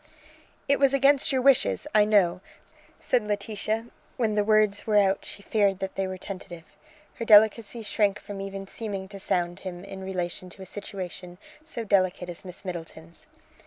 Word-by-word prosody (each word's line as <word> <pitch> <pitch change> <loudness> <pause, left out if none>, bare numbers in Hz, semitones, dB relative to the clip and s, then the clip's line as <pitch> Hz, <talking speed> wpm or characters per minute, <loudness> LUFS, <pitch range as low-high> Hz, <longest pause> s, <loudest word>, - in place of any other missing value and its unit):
"It 280 0 +3
was 275 -1 +4
against 275 0 +4
your 260 -2 +1
wishes, 275 +1 +3
I 210 -1 +6
know," 195 -4 +3 0.6
said 240 -4 0
Laetitia, 210 +1 -2
and 225 +1 -9 0.3
when 225 -4 +1
the 210 0 +2
words 215 -1 +2
were 210 -1 +3
out 195 -1 +3
she 200 - -6
feared 200 -3 +2
that 190 0 -4
they 195 -1 -2
were 185 0 -5
tentative. 180 -3 -9 0.4
Her 230 - -3
delicacy 220 +1 +5
shrank 210 -1 +1
from 205 -2 -7
even 195 0 -6
seeming 200 -2 -5
to 200 -1 -9
sound 175 -1 -1
him 180 -2 -7
in 195 -1 -8
relation 185 -1 -4
to 190 +2 -11
a - - -9
situation 185 -2 -7 0.3
so 245 -7 -5
delicate 185 -3 +1
as 175 - -7
Miss 185 +1 -9
Middleton's. 165 -2 -8
200 Hz, 175 wpm, -26 LUFS, 185-215 Hz, 0.6 s, I